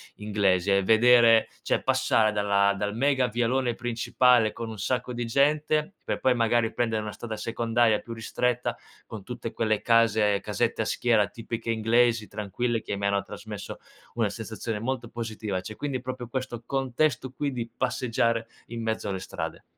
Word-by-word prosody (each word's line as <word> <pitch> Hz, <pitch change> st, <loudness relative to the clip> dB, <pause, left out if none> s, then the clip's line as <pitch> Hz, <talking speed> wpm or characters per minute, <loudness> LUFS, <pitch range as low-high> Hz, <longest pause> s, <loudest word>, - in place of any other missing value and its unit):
inglesi 100 Hz, -3 st, +1 dB
e 100 Hz, 0 st, +3 dB
vedere 115 Hz, +2 st, +6 dB
cioè -, -, 0 dB
passare 110 Hz, -1 st, +2 dB
dalla 100 Hz, -1 st, +2 dB
dal 105 Hz, +1 st, -2 dB
mega 135 Hz, -1 st, +2 dB
vialone 120 Hz, +2 st, 0 dB
principale 120 Hz, -1 st, +2 dB
con 115 Hz, +1 st, -6 dB
un 110 Hz, -, -7 dB
sacco 125 Hz, +4 st, -2 dB
di 120 Hz, 0 st, -3 dB
gente, 150 Hz, -, +1 dB
per -, -, -2 dB
poi 130 Hz, -1 st, +3 dB
magari 115 Hz, 0 st, +2 dB
prendere 115 Hz, -2 st, 0 dB
una 105 Hz, -1 st, -6 dB
strada 110 Hz, -2 st, -6 dB
secondaria 115 Hz, -1 st, +1 dB
più 115 Hz, -, -11 dB
ristretta, 120 Hz, +2 st, -1 dB, 0.3 s
con 105 Hz, -4 st, -8 dB
tutte 120 Hz, -1 st, -6 dB
quelle 110 Hz, -2 st, 0 dB
case 110 Hz, -3 st, +3 dB
casette -, -, -1 dB
a -, -, 0 dB
schiera 115 Hz, -4 st, +2 dB
tipiche 115 Hz, +1 st, -6 dB
inglesi 115 Hz, 0 st, +2 dB
tranquille, 110 Hz, +3 st, -2 dB
che 100 Hz, -, -4 dB
mi 100 Hz, -, -3 dB
hanno 100 Hz, 0 st, +2 dB
trasmesso 105 Hz, -2 st, -8 dB, 0.4 s
una -, -, +1 dB
sensazione 110 Hz, -2 st, -5 dB
molto 120 Hz, 0 st, -3 dB
positiva, 110 Hz, -5 st, -4 dB
cioè 110 Hz, +3 st, -9 dB
quindi 135 Hz, -4 st, -3 dB
proprio 130 Hz, -1 st, -6 dB
questo 130 Hz, -1 st, -4 dB
contesto 135 Hz, 0 st, 0 dB
qui 140 Hz, +1 st, -3 dB
di 120 Hz, -2 st, -5 dB
passeggiare 115 Hz, -2 st, 0 dB, 0.2 s
in 115 Hz, 0 st, -6 dB
mezzo 110 Hz, -2 st, -2 dB
alle 95 Hz, -2 st, -2 dB
strade. -, -, -6 dB
115 Hz, 165 wpm, -27 LUFS, 105-125 Hz, 0.4 s, vedere